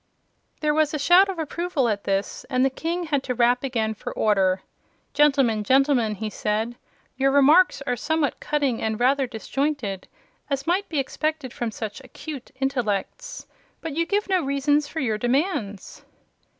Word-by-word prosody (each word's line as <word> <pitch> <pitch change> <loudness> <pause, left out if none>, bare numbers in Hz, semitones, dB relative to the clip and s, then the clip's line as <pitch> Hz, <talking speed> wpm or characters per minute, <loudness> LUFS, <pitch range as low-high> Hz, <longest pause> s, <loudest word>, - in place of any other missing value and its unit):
There 300 -1 +2
was 310 0 +1
a - - 0
shout 355 +7 +5
of 380 - -4
approval 325 -3 -1
at 205 -3 -2
this 195 0 -2
and 255 -1 +2
the 270 - +1
King 335 +6 -3
had 295 -4 0
to 255 -2 -3
rap 245 +1 +3
again 225 -5 -1
for 215 - -7
order. 190 -3 +1 0.5
"Gentlemen, 270 -7 +3
gentlemen!" 260 -3 +3
he 220 +2 -4
said, 215 +3 -2 0.4
"your 270 +1 +3
remarks 285 +3 +5
are 250 -3 -1
somewhat 300 +3 -1
cutting 280 -6 -1
and 220 -1 -2
rather 265 +2 +2
disjointed, 240 -3 -3 0.4
as 275 -1 -2
might 370 +4 0
be 315 - -3
expected 300 0 -2
from 240 - -3
such 220 +2 -6
acute 270 +1 -9
intellects. 270 - -2 0.3
But 320 -3 -6
you 335 +1 0
give 410 +2 0
me 380 -1 +3
no 350 - -1
reasons 285 +2 +1
for 320 - -5
your 220 -6 -1
demands." 245 - -2
270 Hz, 165 wpm, -24 LUFS, 225-305 Hz, 0.5 s, shout